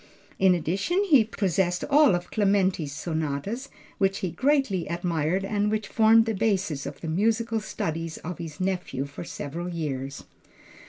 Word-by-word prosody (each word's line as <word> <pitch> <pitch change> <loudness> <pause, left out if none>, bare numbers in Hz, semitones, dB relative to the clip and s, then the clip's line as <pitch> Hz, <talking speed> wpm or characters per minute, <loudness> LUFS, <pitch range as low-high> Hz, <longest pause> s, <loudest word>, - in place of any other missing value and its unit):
In 190 -1 +5
addition, 195 - 0
he 295 - +5
possessed 190 -4 0
all 290 -7 +5
of 175 0 -5
Clementi's 195 -7 +1
sonatas, 160 - -3 0.3
which 195 0 +2
he 175 - -2
greatly 260 - +1
admired 170 +2 -1
and 205 +1 0
which 215 0 -1
formed 225 0 +5
the 225 - -1
basis 190 -9 0
of 140 - -8
the 165 - -5
musical 225 +6 +1
studies 165 -5 -4
of 175 +2 -7
his 160 -3 -7
nephew 185 -7 -2
for 140 +3 -8
several 170 +2 -5
years. 140 -5 -4
185 Hz, 150 wpm, -26 LUFS, 160-215 Hz, 0.3 s, In